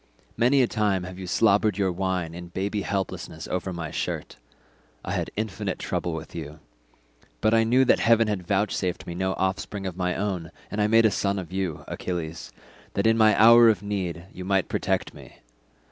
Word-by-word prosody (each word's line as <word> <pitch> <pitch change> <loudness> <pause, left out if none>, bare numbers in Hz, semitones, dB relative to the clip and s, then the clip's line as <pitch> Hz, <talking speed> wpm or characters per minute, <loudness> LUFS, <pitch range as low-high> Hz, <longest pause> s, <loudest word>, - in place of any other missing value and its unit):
Many 125 +4 +4
a - - +2
time 105 -5 0
have 90 +1 -8
you 95 - -6
slobbered 105 0 +3
your 95 -2 +1
wine 90 -2 -2
in 85 0 -8
baby 100 +4 -2
helplessness 100 -1 -4
over 90 +1 -3
my 85 -3 -5
shirt; - - -4 0.7
I - - -3
had - - -2
infinite 105 -2 -3
trouble 85 - -2
with 80 - -8
you, 75 -2 -7 0.8
but 110 +1 +2
I 115 0 +5
knew 125 +4 +4
that - - +4
heaven 115 -1 +4
had 95 -5 -3
vouchsafed 95 -2 -1
me 85 - -5
no 95 +2 -1
offspring 95 +1 -2
of 90 -3 -4
my 90 -1 -1
own, 95 -5 -2 0.2
and 105 - -1
I 105 - +3
made 115 +1 +5
a 110 - +4
son 100 0 0
of 90 -2 -6
you, 95 -5 -3
Achilles, 85 -2 -5 0.4
that 100 - 0
in 115 0 +5
my 110 -2 +4
hour 115 +1 +8
of 105 -2 +1
need 90 -4 -3
you 90 - -7
might 95 0 +1
protect - - -1
me. - - -14
95 Hz, 190 wpm, -25 LUFS, 90-110 Hz, 0.8 s, hour